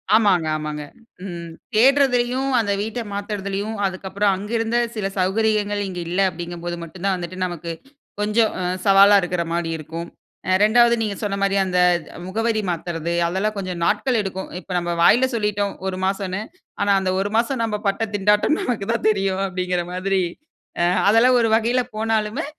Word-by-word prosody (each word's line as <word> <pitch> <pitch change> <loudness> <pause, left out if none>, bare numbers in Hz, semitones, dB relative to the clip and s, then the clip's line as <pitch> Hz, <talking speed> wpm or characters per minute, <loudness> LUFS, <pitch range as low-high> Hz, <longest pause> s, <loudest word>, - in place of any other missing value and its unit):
ஆமாங்க, 195 -7 +3
ஆமாங்க. 150 -1 -5 0.4
ம் 170 -3 -6 0.3
தேடுறதுலயும் 260 +1 +3
அந்த 210 -3 0
வீட்டை 225 +3 -3
மாத்துறதுலயும், 200 +1 -3
அதுக்கப்புறம் 195 +2 0
அங்க 205 +3 -7
இருந்த 225 +1 0 0.2
சில 210 -3 -1
சௌகரியங்கள் 205 +2 +1
இங்கு 180 -2 -5
இல்ல 180 +3 +1
அப்படிங்கும் 175 0 -7
போது 175 0 -2
மட்டும் 170 +2 -10
தான் 195 -1 +2
வந்துட்டு 180 +1 -6
நமக்கு, 175 -2 -5 0.5
கொஞ்சம் 215 +2 +2 0.3
சவாலா 200 +1 +7
இருக்கற 180 -1 -1
மாரி 170 -1 -1
இருக்கும். 165 +2 -7 0.4
அ - - +3
2வது 235 +2 +5
நீங்க 210 -2 -2
சொன்ன 200 -1 -1
மாரி 200 0 +1
அந்த 180 -1 0 0.5
முகவரி 220 +3 0
மாத்துறது 170 -1 -3 0.2
அதெல்லாம் 195 +5 -1
கொஞ்சம் 185 -3 -4
நாட்கள் 255 +5 +1
எடுக்கும். 190 -1 -5
இப்ப 185 - -12
நம்ம 175 0 -1
வாயில 240 +9 +6
சொல்லிட்டோம் 210 -2 -1
1 185 - -3
மாசம்னு. 195 0 -2 0.4
ஆனா 200 - +2
அந்த 190 -1 -1
1 200 +1 -1
மாசம் 235 +2 0
நம்ம 220 -2 -1
பட்ட 200 +3 0
திண்டாட்டம் 210 +9 +3
நமக்கு 230 -5 -2
தான் 230 - -2
தெரியும். 195 -2 0
அப்படிங்கிற 180 -1 -2
மாதிரி 190 +1 0 0.6
அ - - +3 0.2
அதெல்லாம் 240 +4 +5
ஒரு 230 - +3
வகையில 235 +3 +2
போனாலுமே, 220 +5 -1
200 Hz, 160 wpm, -21 LUFS, 180-220 Hz, 0.6 s, சவாலா